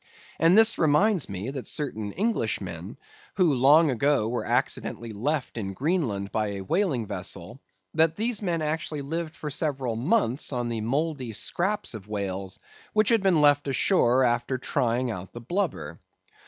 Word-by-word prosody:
And 165 +5 +5
this 225 0 +6
reminds 165 - +3
me 100 +6 -4
that 135 -2 -6
certain 110 -8 -3
Englishmen, 225 +4 -2 0.4
who 180 -6 +3
long 145 +4 +5
ago 135 -2 +1
were 120 +1 -3
accidentally 115 -1 -1
left 130 +3 -2
in 95 -2 -4
Greenland 130 - -1
by 110 -1 0
a 100 - -5
whaling 145 - 0
vessel—that 105 - -3
these 225 +1 -1
men 170 -5 -1
actually 155 -1 -2
lived 165 +3 -4
for 150 - -6
several 135 -6 -2
months 140 - +1
on 120 -2 -2
the 115 -2 -3
mouldy 135 0 -2
scraps 190 - -1
of 105 -3 -9
whales 100 -2 -4 0.4
which 215 -1 +3
had 230 -3 +4
been 185 -5 +3
left 145 -1 +4
ashore 130 -3 +3
after 120 +1 +1
trying 125 -2 0
out 95 -3 -7
the 120 - -7
blubber. 115 - -3
135 Hz, 155 wpm, -26 LUFS, 110-165 Hz, 0.4 s, this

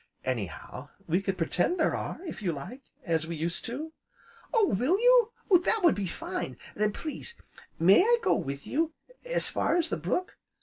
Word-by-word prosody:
Anyhow, 115 -9 -4 0.2
we 175 +4 +1
can 195 -1 -1
pretend 180 - 0
there 320 - +2
are, - - -4
if 325 - -6
you 185 -4 0
like, 195 - -8 0.2
as 160 -3 0
we 170 - -4
used 165 +2 -2
to 300 +7 -5 0.3
" - - -26
"Oh 445 -5 +4
will 265 - +2
you? 485 -1 +5 0.3
that 445 +3 +2
would 340 - +6
be 200 -2 -2
fine! 130 -6 -5 0.2
Then, 210 0 +1
please, 315 - -5 0.4
may 185 - +6
I 475 +4 +4
go - - +4
with 140 +1 -3
you 320 +2 0 0.3
as - - 0
far - - +1
as 345 -1 +2
the - - -1
brook? 365 +1 -2
235 Hz, 185 wpm, -29 LUFS, -, 0.4 s, would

